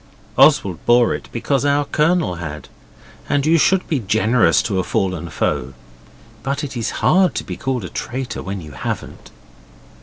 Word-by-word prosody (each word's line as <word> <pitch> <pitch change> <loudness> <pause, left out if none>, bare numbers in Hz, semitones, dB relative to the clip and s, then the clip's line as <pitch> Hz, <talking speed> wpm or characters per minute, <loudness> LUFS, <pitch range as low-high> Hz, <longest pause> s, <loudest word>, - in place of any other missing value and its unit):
Oswald 90 -4 +4
bore 120 0 +5
it - - -7
because 135 +3 -1
our 145 0 +2
Colonel 155 - +1
had, 75 -3 -7 0.6
and 145 -1 +1
you 165 +1 +4
should 190 +4 +2
be 150 - 0
generous 110 -3 +2
to 100 -4 -1
a - - 0
fallen 90 -2 -2
foe, 65 -3 -2 0.7
but 140 +5 -2
it 135 -2 -5
is 115 -2 -2 0.2
hard 185 -1 +4
to - - -2
be - - -6
called 130 -6 -3
a - - -6
traitor 130 +1 -5
when 95 0 -5
you 75 -2 -10
haven't. 70 - -6
120 Hz, 170 wpm, -19 LUFS, 90-145 Hz, 0.7 s, bore